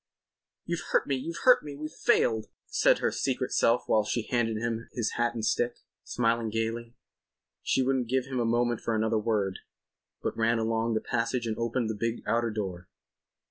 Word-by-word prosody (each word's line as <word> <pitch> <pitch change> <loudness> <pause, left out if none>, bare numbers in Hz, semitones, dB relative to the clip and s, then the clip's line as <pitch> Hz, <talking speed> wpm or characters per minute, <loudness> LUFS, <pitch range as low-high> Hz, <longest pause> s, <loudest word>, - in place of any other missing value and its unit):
"You've 170 -1 -2
hurt - - +4
me; 140 - 0
you've 165 +6 -5
hurt 255 -1 +7
me! 145 -1 -7
We've 155 +2 -6
failed!" 110 -8 +2 0.2
said - - +3
her - - 0
secret - - -1
self 115 +2 +3
while 110 - +3
she 110 +2 -1
handed 115 -3 0
him 115 0 -3
his 115 -4 -1
hat 120 0 0
and 110 -2 -2
stick, 120 +1 +1 0.3
smiling 115 -1 0
gaily. 115 +2 -3 0.7
She 130 - +1
wouldn't 130 -2 0
give 130 0 +1
him 130 -1 -3
a - - +2
moment 120 0 +1
for 115 - -1
another 110 0 +1
word, 105 -4 0 0.6
but - - -1
ran 115 +1 +2
along 115 0 0
the 110 - +1
passage 120 +1 -1
and 110 -1 -1
opened 115 +1 -1
the 110 - -1
big 115 +2 -2
outer 115 0 +1
door. 95 -5 -5
115 Hz, 185 wpm, -28 LUFS, 110-120 Hz, 0.7 s, hurt